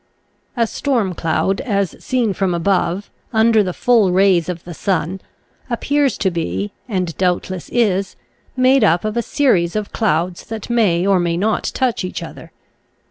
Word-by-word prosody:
A 230 - +3
storm 225 -5 -1
cloud 175 +4 0
as 200 -7 -1
seen 245 -6 0
from 190 -2 0
above, 185 +2 0 0.2
under 225 -1 +4
the 185 -3 -1
full 225 -2 +3
rays 185 -2 +3
of 175 -2 -5
the 175 - -8
sun, 185 +1 -2 0.5
appears 280 +3 0
to 190 - 0
be, 100 - -3 0.2
and 185 -5 -2
doubtless 185 0 -1
is, 200 -5 0 0.4
made 255 0 +4
up 175 -1 +3
of 215 +1 -2
a 235 - +1
series 200 -11 +1
of 215 -1 -3
clouds 175 -4 0
that 225 +1 -6
may 195 -7 +2
or 195 -2 +3
may 170 -1 0
not 215 +4 0
touch 255 -6 0
each 185 - -4
other. - - -10
195 Hz, 160 wpm, -18 LUFS, 175-225 Hz, 0.5 s, under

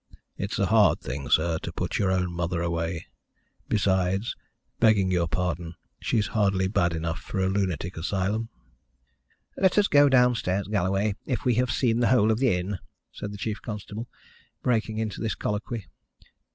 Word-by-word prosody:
"It's - - -3
a - - +2
hard - - +4
thing, 70 +1 -5
sir, 80 0 +3
to - - -6
put - - -2
your 95 - +2
own 90 -1 0
mother 85 0 -1
away. 85 0 -2 0.6
Besides, 95 0 +1 0.4
begging 105 -5 +4
your 85 -2 +1
pardon, 85 -1 -2 0.2
she's 110 -3 +1
hardly 95 -3 +2
bad 85 -3 +1
enough 80 +1 -2
for - - -7
a 95 - +2
lunatic 95 -3 -1
asylum." 100 +6 -1 1.1
"Let 190 0 +3
us 205 -1 +5
go 145 -1 +6
downstairs, 120 -7 +2
Galloway, 100 0 +1
if 125 -5 -2
we 125 - +4
have 125 - -1
seen 120 -3 +1
the 120 - +3
whole 110 -4 +4
of 110 - 0
the 130 -7 +3
inn," 95 +2 -3 0.3
said 105 - -6
the 105 - -7
chief 105 +2 -3
constable, 105 +1 -6 0.6
breaking 110 -3 0
into 110 -3 -3
this 110 -1 -1
colloquy. 105 +1 -3
100 Hz, 165 wpm, -26 LUFS, 90-110 Hz, 1.1 s, go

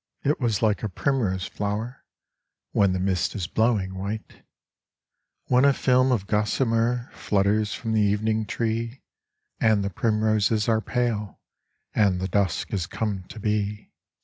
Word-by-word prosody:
It 145 +2 +1
was 115 -4 0
like 105 -2 +2
a 110 - -2
primrose 100 -4 0
flower 105 +6 -4 0.7
When 100 -2 +3
the 90 - -1
mist 95 -1 0
is 95 -5 -2
blowing 105 -1 +1
white, 100 +3 -6 1.0
When 125 +1 +3
a 140 0 +6
film 130 0 +3
of 110 -6 0
gossamer 115 +3 0
Flutters 105 +1 +1
from 115 -1 -3
the 110 - +3
evening 110 +1 +1
tree, 115 +3 -2 0.6
And 110 -3 +3
the 100 - -2
primroses 110 +1 +1
are 110 -1 +2
pale 110 -2 -2 0.5
And 100 -4 +3
the 95 - -2
dusk 95 -2 0
has 90 -5 -1
come 100 -4 -3
to 110 - -9
be. 105 -1 -2
105 Hz, 145 wpm, -25 LUFS, 100-115 Hz, 1.0 s, a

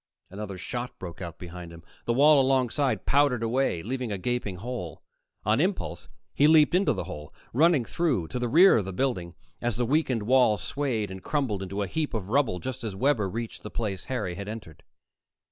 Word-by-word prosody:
Another 100 -1 -6
shot 120 +6 -5
broke 90 0 -8
out 85 -2 -6
behind 90 -1 -9
him. 85 0 -12 0.2
The 120 - +1
wall 145 +3 +6
alongside 130 +1 +1
powdered 140 -4 +3
away, 115 -7 0
leaving 125 0 -3
a 100 - -1
gaping 105 -1 -2
hole. 95 -5 -6 0.4
On 110 +6 +3
impulse, 185 +3 -2 0.2
he 145 - +4
leaped 155 0 +6
into 185 +2 +3
the - - -3
hole, 75 0 -8 0.2
running 150 -1 +4
through 140 - 0
to 125 - -3
the 120 - -1
rear 175 +6 +7
of 105 - -1
the 95 - -5
building 90 -8 -1 0.3
as 120 -3 0
the 120 - 0
weakened 130 -4 +1
wall 125 -2 +4
swayed 120 -9 -2
and 95 0 -7
crumbled 130 -9 -1
into 100 +2 -3
a - - -1
heap 150 - -2
of 100 -3 -4
rubble 130 -6 +2
just 130 +7 -5
as 105 -4 -4
Webber 110 -3 +1
reached 115 +4 -5
the 105 - -7
place 100 -6 -3
Harry 110 -9 -2
had 100 +3 -7
entered. 105 -8 -8
115 Hz, 195 wpm, -27 LUFS, 95-135 Hz, 0.4 s, rear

